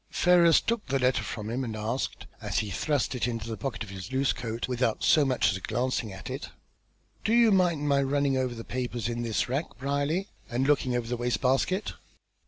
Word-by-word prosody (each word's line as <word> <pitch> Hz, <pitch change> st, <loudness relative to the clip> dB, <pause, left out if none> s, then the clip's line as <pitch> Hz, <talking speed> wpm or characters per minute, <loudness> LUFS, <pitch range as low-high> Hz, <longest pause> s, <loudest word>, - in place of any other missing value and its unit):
Ferrars 175 Hz, -2 st, +5 dB
took 230 Hz, -2 st, -1 dB
the 135 Hz, -, +1 dB
letter 130 Hz, 0 st, +2 dB
from 110 Hz, -1 st, -5 dB
him, 130 Hz, +3 st, -1 dB
and 115 Hz, -3 st, -4 dB
asked, 110 Hz, +5 st, -3 dB, 0.2 s
as -, -, -2 dB
he 105 Hz, -2 st, -1 dB
thrust 145 Hz, -, 0 dB
it 125 Hz, -1 st, -1 dB
into 115 Hz, -2 st, -3 dB
the 115 Hz, -, -3 dB
pocket 130 Hz, -2 st, -4 dB
of 100 Hz, -, -10 dB
his 95 Hz, +4 st, -7 dB
loose 135 Hz, +1 st, +2 dB
coat 115 Hz, 0 st, -4 dB
without 125 Hz, -3 st, 0 dB
so 155 Hz, -, +5 dB
much 130 Hz, -9 st, +2 dB
as 95 Hz, -, -3 dB
glancing 115 Hz, +1 st, -1 dB
at 95 Hz, -, -9 dB
it, -, -, -5 dB, 0.7 s
"Do -, -, 0 dB
you 235 Hz, -2 st, +6 dB
mind 175 Hz, -6 st, +2 dB
my 140 Hz, -1 st, +3 dB
running 140 Hz, 0 st, +1 dB
over 130 Hz, -2 st, -1 dB
the 115 Hz, -, -7 dB
papers 125 Hz, -2 st, -3 dB
in 120 Hz, 0 st, -2 dB
this 115 Hz, -2 st, 0 dB
rack, 135 Hz, +6 st, -3 dB
Brierly? 145 Hz, +8 st, -1 dB, 0.2 s
and 125 Hz, +3 st, 0 dB
looking 135 Hz, -3 st, +2 dB
into 120 Hz, -2 st, -1 dB
the 120 Hz, -, -1 dB
waste 120 Hz, 0 st, -1 dB
basket?" 135 Hz, +10 st, +1 dB
130 Hz, 210 wpm, -28 LUFS, 115-145 Hz, 0.7 s, you